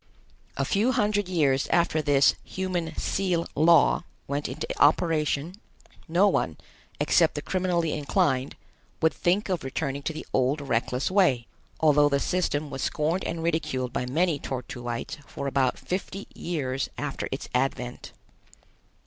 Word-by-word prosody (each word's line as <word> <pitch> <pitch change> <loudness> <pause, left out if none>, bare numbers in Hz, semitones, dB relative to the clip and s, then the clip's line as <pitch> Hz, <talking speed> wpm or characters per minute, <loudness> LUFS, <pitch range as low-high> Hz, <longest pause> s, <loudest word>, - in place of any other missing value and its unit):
A 135 - +1
few 220 - +2
hundred 205 -3 +1
years 140 -7 +2
after 170 -2 +2
this 140 -2 +4
"Human 180 -4 -3
Seal 180 -3 0
Law" 170 +3 +5 0.2
went 140 +1 -2
into - - -4 0.2
operation, 155 0 +2 0.5
no 175 +5 +4
one, 80 - 0 0.4
except - - +3
the 145 - -2
criminally 180 -3 0
inclined, 135 -2 0 0.4
would 160 -1 +3
think 185 +4 +1
of 185 -3 -1
returning 135 +1 -3
to 150 - -2
the 155 - -7
old 130 +4 +2
reckless 125 +1 -1
way, 170 - +3 0.3
although 150 -2 +5
the 140 -1 +2
system 155 -3 -1
was 135 - -5
scorned 165 +3 0
and 165 -1 -3
ridiculed 130 -7 -1
by 125 - -2
many 160 +3 +1
Tor 130 -2 -4
tuites 120 +4 -5
for 140 - -6
about 135 -2 +1
fifty 195 +2 -4
years 135 -6 -3
after 145 -2 -3
its 135 - -4
advent. 125 -1 -2
150 Hz, 140 wpm, -26 LUFS, 135-175 Hz, 0.5 s, Law